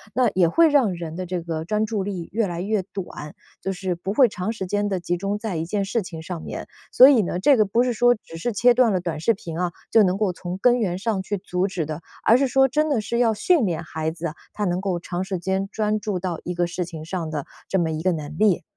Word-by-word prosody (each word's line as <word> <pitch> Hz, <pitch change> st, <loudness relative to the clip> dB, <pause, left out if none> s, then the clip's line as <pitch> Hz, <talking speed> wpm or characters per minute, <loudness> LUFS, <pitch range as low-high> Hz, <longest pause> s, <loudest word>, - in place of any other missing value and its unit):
那 250 Hz, -3 st, +4 dB
也 180 Hz, -3 st, +4 dB
会 330 Hz, -, +5 dB
让 265 Hz, -10 st, +3 dB
人 165 Hz, -1 st, -6 dB
的 185 Hz, -, -4 dB
这 180 Hz, 0 st, -2 dB
个 165 Hz, -1 st, -4 dB
专 215 Hz, +3 st, 0 dB
注 215 Hz, -2 st, -2 dB
力 185 Hz, -4 st, -5 dB
越 220 Hz, -1 st, +1 dB
来 175 Hz, -1 st, -4 dB
越 205 Hz, +1 st, 0 dB
短， 175 Hz, -5 st, -8 dB, 0.3 s
就 195 Hz, -, -2 dB
是 185 Hz, 0 st, -2 dB
不 175 Hz, +3 st, -4 dB
会 255 Hz, +3 st, +6 dB
长 205 Hz, 0 st, -3 dB
时 205 Hz, -4 st, -4 dB
间 205 Hz, +2 st, -1 dB
地 190 Hz, -, -1 dB
集 175 Hz, 0 st, -1 dB
中 200 Hz, +2 st, -2 dB
在 210 Hz, -4 st, -4 dB
一 160 Hz, 0 st, -2 dB
件 200 Hz, +2 st, -1 dB
事 220 Hz, +3 st, 0 dB
情 165 Hz, -3 st, -8 dB
上 170 Hz, -1 st, -5 dB
面。 -, -, -6 dB, 0.2 s
所 255 Hz, -, +9 dB
以 255 Hz, -6 st, +5 dB
呢， 175 Hz, -2 st, -2 dB
这 280 Hz, +9 st, +5 dB
个 215 Hz, -, +5 dB
不 230 Hz, +5 st, +2 dB
是 250 Hz, -1 st, 0 dB
说 245 Hz, +2 st, +4 dB
只 165 Hz, -, -14 dB
是 240 Hz, +8 st, -2 dB
切 240 Hz, +4 st, +5 dB
断 245 Hz, -2 st, +4 dB
了 185 Hz, -, +1 dB
短 170 Hz, -3 st, -3 dB
视 230 Hz, +9 st, +3 dB
频 170 Hz, -5 st, -7 dB
啊， 180 Hz, -1 st, 0 dB, 0.2 s
就 220 Hz, -2 st, +6 dB
能 185 Hz, 0 st, +1 dB
够 205 Hz, -3 st, +1 dB
从 180 Hz, 0 st, -6 dB
根 245 Hz, +4 st, +3 dB
源 180 Hz, -5 st, -1 dB
上 205 Hz, 0 st, -1 dB
去 205 Hz, +2 st, -3 dB
阻 185 Hz, 0 st, -1 dB
止 180 Hz, -4 st, -3 dB
的。 155 Hz, +2 st, -5 dB, 0.2 s
而 235 Hz, -, +6 dB
是 275 Hz, -, +2 dB
说 270 Hz, +1 st, +4 dB
真 305 Hz, +4 st, +1 dB
的 255 Hz, -7 st, +1 dB
是 235 Hz, +3 st, -2 dB
要 230 Hz, -2 st, +3 dB
训 250 Hz, -, +3 dB
练 170 Hz, -3 st, -2 dB
孩 160 Hz, 0 st, -3 dB
子， 165 Hz, -1 st, -5 dB, 0.2 s
他 210 Hz, -, -2 dB
能 180 Hz, 0 st, 0 dB
够 185 Hz, -3 st, -1 dB
长 175 Hz, +2 st, -4 dB
时 190 Hz, -1 st, -3 dB
间 190 Hz, +2 st, -1 dB
专 215 Hz, 0 st, 0 dB
注 205 Hz, -3 st, -2 dB
到 175 Hz, -2 st, -3 dB
一 180 Hz, -, -3 dB
个 175 Hz, 0 st, +1 dB
事 180 Hz, +1 st, -3 dB
情 165 Hz, -3 st, -8 dB
上 165 Hz, -2 st, -3 dB
的 150 Hz, -3 st, -4 dB, 0.2 s
这 195 Hz, -, 0 dB
么 165 Hz, -2 st, 0 dB
一 155 Hz, 0 st, -3 dB
个 185 Hz, -, +2 dB
能 155 Hz, -2 st, -5 dB
力。 210 Hz, -7 st, +3 dB
190 Hz, 295 characters per minute, -23 LUFS, 175-220 Hz, 0.3 s, 所